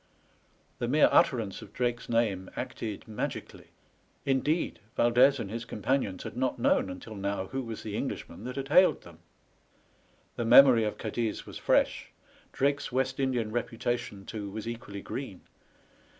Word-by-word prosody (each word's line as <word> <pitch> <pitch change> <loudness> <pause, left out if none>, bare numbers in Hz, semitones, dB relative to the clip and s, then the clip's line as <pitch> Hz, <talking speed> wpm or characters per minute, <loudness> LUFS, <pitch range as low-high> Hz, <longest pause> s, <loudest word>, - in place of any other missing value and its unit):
The 120 - -1
mere 150 +5 +5
utterance 115 -7 +2
of 105 - -12
Drake's 120 -1 -2
name 105 -5 0
acted 110 -1 -5
magically 110 -1 -5 0.3
— - - -38
indeed, 150 +5 0 0.2
Yaldez 125 +3 +5
and 100 -4 -5
his 115 +1 -4
companions 115 -3 -1
had - - -7
not 130 +1 0
known 110 -4 +2
until 90 +4 -8
now 100 -1 -2
who 135 - -2
was 115 -3 -6
the 105 -2 -5
Englishman 95 - -5
that 125 - -5
had 135 0 -4
hailed 180 +5 +5
them. 85 -2 -14 1.2
The 120 - -1
memory 120 -1 +8
of 105 - -3
Cadiz 110 0 -3
was - - -8
fresh, - - +1 0.4
Drake's 140 +1 0
West 130 +2 0
Indian 125 -5 0
reputation, 120 -3 -3
too, 105 -3 -5
was 110 +3 -6
equally 115 -4 -6
green. 115 -9 -6
115 Hz, 150 wpm, -29 LUFS, 105-130 Hz, 1.2 s, memory